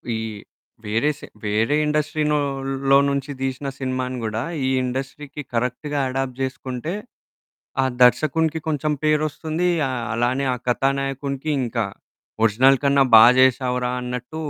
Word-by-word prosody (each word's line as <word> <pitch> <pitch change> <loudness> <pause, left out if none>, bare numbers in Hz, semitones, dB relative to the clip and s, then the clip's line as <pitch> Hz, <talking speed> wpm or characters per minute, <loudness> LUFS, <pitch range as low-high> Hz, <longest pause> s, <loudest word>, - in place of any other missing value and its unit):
ఈ - - -1 0.7
వేరే 110 +8 +1
సే - - -10 0.2
వేరే 110 +7 +1
ఇండస్ట్రీనోలో 140 -3 +1
నుంచి 140 +1 -2
దీసిన 135 +1 -3
సినిమాని 130 -1 -3
గూడా 110 +1 -2 0.2
ఈ - - +1 0.2
ఇండస్ట్రీకి 135 +3 -5
కరెక్ట్‌గా 125 +5 -2
అడాప్ట్ 130 -1 -3
జేసుకుంటే, 130 +3 -4 0.9
ఆ - - +2 0.2
దర్శకునికి 155 +5 +3
కొంచెం 155 0 0
పేరొస్తుందీ, 155 +3 0 0.2
ఆహ్, 125 -3 -3
అలానే 120 +4 0
ఆ - - -2
కథానాయకునికి 135 +2 -1
ఇంకా. 115 -3 -1 0.6
ఒరిజినల్ 130 +5 +4
కన్నా 140 0 +5
బా 110 0 +10
జేశావురా 125 -1 +2
అన్నట్టూ 125 +5 -5
135 Hz, 115 wpm, -22 LUFS, 125-145 Hz, 0.9 s, బా